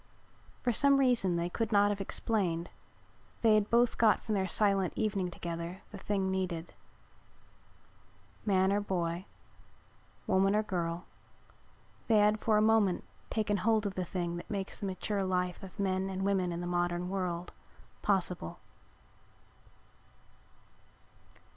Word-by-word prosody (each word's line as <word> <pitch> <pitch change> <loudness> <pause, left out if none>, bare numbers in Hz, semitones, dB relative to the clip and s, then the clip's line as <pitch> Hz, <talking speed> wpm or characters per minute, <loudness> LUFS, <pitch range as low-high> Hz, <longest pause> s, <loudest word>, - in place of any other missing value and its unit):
For 245 - +2
some 280 +4 +4
reason 245 -9 +3
they 170 0 0
could 225 +5 -2
not 205 0 +4
have 200 -1 -3
explained 185 -5 -1 0.7
they 225 -1 +6
had 215 -1 +3
both 235 0 +3
got 220 -2 +5
from 220 - -2
their 190 -2 +1
silent 195 -3 +2
evening 200 -4 0
together 170 +1 -6
the 200 - -8
thing 195 -1 -1
needed. 180 -3 -3 1.7
Man 190 -2 +3
or 205 - +1
boy, 175 -2 -2 1.0
woman 195 +2 +3
or 215 - +2
girl, 175 -3 -3 1.0
they 225 - +4
had 210 +1 +4
for 215 -1 +2
a 210 - +4
moment 215 -4 +3 0.3
taken 210 -2 0
hold 220 +1 +2
of 200 - -2
the 185 - -2
thing 175 -1 -3
that 175 - -9
makes 195 -2 -4
the 200 - -3
mature 195 +1 -2
life 180 -1 -1
of 195 +1 -11
men 190 -1 0
and 190 0 -2
women 190 -3 +1
in 170 0 -4
the - - -4
modern 175 0 -1
world 180 -2 -3 0.5
possible. 180 - -1
195 Hz, 140 wpm, -31 LUFS, 180-210 Hz, 1.7 s, they